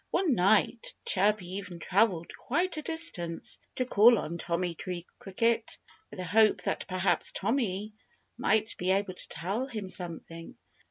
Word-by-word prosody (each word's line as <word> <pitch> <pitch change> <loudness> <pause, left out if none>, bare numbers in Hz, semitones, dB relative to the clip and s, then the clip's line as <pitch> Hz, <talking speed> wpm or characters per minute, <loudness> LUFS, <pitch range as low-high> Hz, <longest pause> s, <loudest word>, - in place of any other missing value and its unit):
One 345 -5 +2
night 210 +4 +2
Chirpy 205 0 +2
even 185 -3 -7
travelled 185 -1 +1
quite 340 +7 0
a 310 - -3
distance 295 - -2 0.2
to 255 - 0
call 230 0 +6
on 170 -2 -4
Tommy 170 +1 -1
Tree 175 0 -5
Cricket, 230 +4 0 0.3
with - - -11
the 185 - -4
hope 215 +4 +4
that - - -2
perhaps 185 0 +1
Tommy 210 -2 -1 0.4
might 215 +2 +1
be 180 - -1
able 195 0 +1
to - - -8
tell 195 - -2
him 215 -7 -5
something. 165 -2 -5
200 Hz, 150 wpm, -29 LUFS, 180-230 Hz, 0.4 s, call